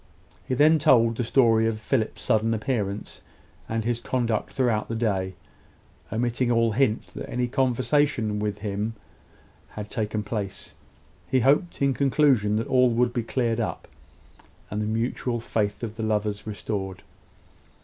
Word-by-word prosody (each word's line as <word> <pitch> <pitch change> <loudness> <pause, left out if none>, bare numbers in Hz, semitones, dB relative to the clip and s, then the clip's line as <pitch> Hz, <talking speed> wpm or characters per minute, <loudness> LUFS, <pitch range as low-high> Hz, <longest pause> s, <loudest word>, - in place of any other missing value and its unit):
He 130 - 0
then 155 +4 +5
told 115 -6 +4
the 120 - -1
story 115 -2 +4
of 110 -1 -2
Philip's 110 0 -1
sudden 115 -1 +2
appearance, 105 -3 -3 0.5
and 115 0 -1
his 120 +1 -1
conduct 120 -3 -1
throughout 120 -5 0
the 115 - -2
day, 95 -5 -1 0.8
omitting 120 +2 0
all 115 -1 +3
hint 115 -1 +1
that - - -8
any 125 0 -1
conversation 130 -3 +1
with 105 -1 -2
himself 105 +2 -3 0.8
had 105 0 -7
taken 105 -1 -2
place. 105 -2 -4 0.6
He 130 - +3
hoped, 145 - +2
in 140 -1 +3
conclusion, 135 -6 +3
that 110 +1 0
all 125 -1 +4
would 120 +1 +1
be 120 - 0
cleared 115 0 -1
up, 115 - -3 0.8
and 105 +1 -2
the 105 - -1
mutual 120 +2 -1
faith 105 -1 -2
of 110 -1 -5
the - - -4
lovers 105 -1 -1
restored. 95 -3 -4
115 Hz, 150 wpm, -25 LUFS, 105-125 Hz, 0.8 s, then